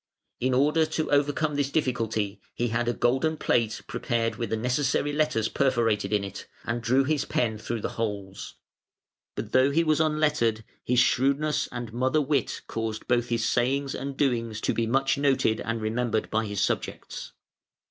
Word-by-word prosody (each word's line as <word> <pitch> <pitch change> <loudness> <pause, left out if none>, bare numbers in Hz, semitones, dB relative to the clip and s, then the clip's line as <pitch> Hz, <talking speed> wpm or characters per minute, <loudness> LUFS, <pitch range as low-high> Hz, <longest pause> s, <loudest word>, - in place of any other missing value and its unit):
In 130 +1 +1
order 150 +4 +3
to 155 0 -2
overcome 145 +1 +2
this 145 -1 0
difficulty 115 -8 -1
he 120 0 0
had 115 +2 -1
a 120 - +2
golden 135 +7 +1
plate 115 -6 0
prepared 115 -1 -1
with 115 - -3
the 110 - 0
necessary 130 +4 0
letters 150 -8 +1
perforated 115 -7 +1
in 105 -1 +2
it, 100 - -7 0.2
and 120 +1 -2
drew 130 +4 +3
his 145 +1 0
pen 110 -3 -1
through 115 +1 -4
the - - -2
holes. 100 -3 -4 0.8
But, 110 - -5
though 130 +1 +5
he 160 +4 +2
was 155 -1 +2
unlettered, 150 -8 +1 0.2
his 125 - 0
shrewdness 140 +5 +2
and 120 -2 -6
mother 130 +5 +2
wit 140 -3 0
caused 110 -1 -4
both 120 -1 +2
his 115 -1 0
sayings 135 +3 +1
and 135 0 -5
doings 115 -6 0
to - - 0
be 115 -1 0
much 135 +3 +1
noted 135 -5 +2
and 115 0 -2
remembered 110 0 -1
by 110 0 0
his 100 -1 -2
subjects. - - -3
125 Hz, 170 wpm, -27 LUFS, 115-140 Hz, 0.8 s, though